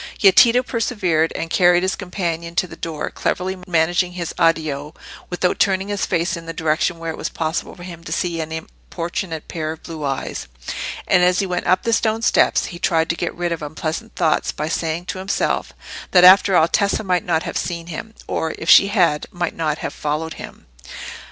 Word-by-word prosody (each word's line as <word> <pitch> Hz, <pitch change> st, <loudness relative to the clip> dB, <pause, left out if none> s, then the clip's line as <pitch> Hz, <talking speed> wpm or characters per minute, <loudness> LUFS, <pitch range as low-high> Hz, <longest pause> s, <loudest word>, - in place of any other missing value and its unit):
Yet 195 Hz, -3 st, +6 dB
Tito 245 Hz, +1 st, +6 dB
persevered 190 Hz, -10 st, 0 dB
and 165 Hz, -, -4 dB
carried 175 Hz, -1 st, +4 dB
his 190 Hz, -, 0 dB
companion 170 Hz, -3 st, -4 dB
to 180 Hz, -, +2 dB
the -, -, -10 dB
door, 160 Hz, -2 st, -4 dB
cleverly 185 Hz, +1 st, -2 dB
managing 175 Hz, +1 st, +1 dB
his 175 Hz, -2 st, -4 dB
"addio" 155 Hz, -3 st, 0 dB, 0.3 s
without 180 Hz, 0 st, 0 dB
turning 195 Hz, 0 st, +2 dB
his 205 Hz, -1 st, -1 dB
face 175 Hz, +3 st, 0 dB
in 165 Hz, -1 st, -9 dB
a -, -, -3 dB
direction 160 Hz, +2 st, 0 dB
where 165 Hz, 0 st, -4 dB
it -, -, -8 dB
was -, -, -2 dB
possible 160 Hz, 0 st, -3 dB
for 175 Hz, -, -11 dB
him 170 Hz, -2 st, -9 dB
to -, -, -7 dB
see 170 Hz, -2 st, -1 dB
an 160 Hz, 0 st, -6 dB
importunate 165 Hz, +1 st, -5 dB
pair 155 Hz, -2 st, -3 dB
of 160 Hz, -, -15 dB
blue 160 Hz, -3 st, -7 dB
eyes; 135 Hz, -, -3 dB, 0.6 s
and 180 Hz, -, +4 dB
as 180 Hz, 0 st, +4 dB
he 195 Hz, -, +1 dB
went 180 Hz, -1 st, -2 dB
up 185 Hz, +1 st, +3 dB
the 230 Hz, -, +1 dB
stone 225 Hz, 0 st, +1 dB
steps, -, -, +3 dB
he 175 Hz, -, -8 dB
tried 165 Hz, -2 st, +1 dB
to 170 Hz, -, +1 dB
get 175 Hz, -, -3 dB
rid 175 Hz, 0 st, -2 dB
of 165 Hz, -, -3 dB
unpleasant 160 Hz, +8 st, -5 dB
thoughts 165 Hz, -4 st, +1 dB
by 150 Hz, -, -4 dB
saying 165 Hz, +1 st, -2 dB
to 185 Hz, -, -5 dB
himself 190 Hz, +1 st, -1 dB, 0.4 s
that 180 Hz, -1 st, +5 dB
after 190 Hz, +1 st, +8 dB
all 160 Hz, -, +5 dB
Tessa 200 Hz, +4 st, +1 dB
might 180 Hz, -4 st, +1 dB
not 165 Hz, -2 st, 0 dB
have -, -, -5 dB
seen 170 Hz, -2 st, -3 dB
him, 175 Hz, +7 st, -7 dB
or, 160 Hz, -1 st, -2 dB
if 160 Hz, -, +1 dB
she 195 Hz, -, +8 dB
had, 175 Hz, -7 st, +2 dB
might 175 Hz, -1 st, -3 dB
not 155 Hz, -2 st, -1 dB
have -, -, -5 dB
followed 155 Hz, +2 st, -3 dB
him. -, -, -11 dB
170 Hz, 205 wpm, -20 LUFS, 160-185 Hz, 0.6 s, after